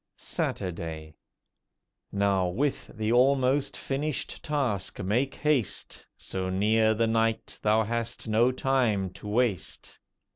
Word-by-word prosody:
SATURDAY 80 -3 -4 1.0
Now 100 -2 +2
with 130 +11 -1
the 110 0 0
almost 130 +2 +3
finished 145 +2 -3
task 130 -11 -1
make 120 +8 0
haste. 145 -8 -1
So 95 -1 -3
near 110 +3 +3
the 115 +1 +2
night 115 0 0
thou 110 +1 +3
hast 115 +1 -3
no 115 +3 +4
time 120 -8 +1
to 105 - -10
waste. 110 -3 -1
110 Hz, 110 wpm, -28 LUFS, 100-130 Hz, 1.0 s, no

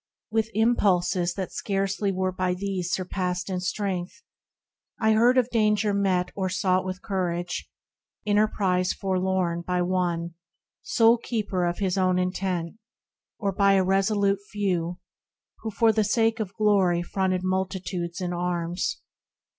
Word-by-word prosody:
With 220 0 +1
impulses, 185 -6 +2
that 190 -2 -4
scarcely 195 0 -1
were 185 0 -1
by 185 0 -1
these 185 -2 -3
Surpassed 185 0 -2
in 185 - -1
strength, 185 - -3 0.8
I 220 -1 +3
heard 235 +4 +4
of 250 -1 +2
danger 210 -2 +2
met 185 -3 +1
Or 190 -2 -2
sought 185 0 +1
with 185 +2 -5
courage; 180 -4 -2 0.6
enterprise 205 -3 +2
forlorn 185 -3 0
By 180 +1 0
one, 175 -2 -1 0.5
sole 235 -7 +4
keeper 205 -7 -1
of 175 - -2
his 195 -1 0
own 185 -1 +2
intent, 180 -1 -2 0.6
Or 200 -2 -1
by 200 0 +3
a 190 -1 +4
resolute 195 +1 +2
few, 180 -4 -1 0.6
who 225 - -4
for 225 +1 +3
the 215 0 +2
sake 225 +2 +1
Of 200 -3 -4
glory 195 -5 +3
fronted 185 0 -1
multitudes 185 -1 -2
in 180 -1 -2
arms. 175 0 -2
190 Hz, 135 wpm, -26 LUFS, 180-205 Hz, 0.8 s, heard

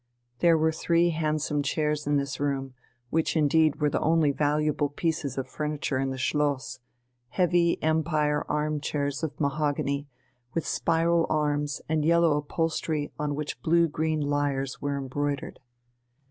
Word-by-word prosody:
There 170 -1 +5
were 160 0 +2
three 170 +2 +2
handsome 155 -2 0
chairs 150 +1 -1
in 145 0 +3
this 140 -1 -3
room, 135 -2 -2 0.4
which 160 +1 +1
indeed 155 0 +3
were 150 -2 +1
the - - 0
only 160 -2 +3
valuable 150 0 +1
pieces 145 -3 -2
of 135 - -2
furniture 150 -3 -2
in 135 0 0
the 130 - -4
Schloss, 140 -1 -1 0.5
heavy 175 -1 +2
Empire 155 -2 +1
arm 150 0 0
chairs 140 -1 -2
of 155 -3 -4
mahogany, 140 -1 -1 0.5
with 165 - -1
spiral 165 0 +1
arms 145 -2 0
and 155 -1 +1
yellow 170 -1 +4
upholstery 155 0 -2
on 150 -1 -1
which 150 0 -5
blue 170 +1 +3
green 155 0 -1
lyres 145 -2 -1
were 140 0 -1
embroidered. 140 +1 -3
150 Hz, 145 wpm, -27 LUFS, 145-160 Hz, 0.5 s, There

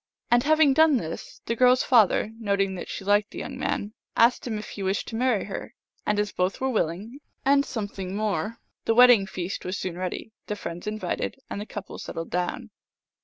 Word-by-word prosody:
And 240 0 +6
having 310 0 +5
done 315 -1 +5
this, 165 -7 -6
the 230 - -1
girl 250 +1 +6
s 255 - +1
father, 220 -3 +4
noting 200 -3 +1
that 185 - -6
she 195 - -6
liked 205 +1 +3
the - - -11
young 265 - -5
man, 210 -4 -2 0.2
asked 235 +2 +4
him 220 -3 -2
if 210 - -7
he 205 - -7
wished 190 +1 -1
to 225 - -6
marry 245 -3 +2
her; - - -7 0.3
and 210 - +2
as 210 0 0
both 180 +1 -1
were 265 0 0
willing, 210 - -2 0.3
and 280 +1 +5
something 200 -6 -5
more, 215 +1 -1 0.3
the 225 - +2
wedding 245 -5 +7
feast 185 +1 -4
was 185 +2 -3
soon 180 -1 -4
ready, 185 +4 -4 0.2
the 210 - -2
friends 175 -2 -7
invited, 215 +1 -2 0.2
and 200 - -3
the 210 - -7
couple 205 -2 -7
settled 165 0 -6
down. 180 +6 -2
210 Hz, 205 wpm, -26 LUFS, 195-245 Hz, 0.3 s, wedding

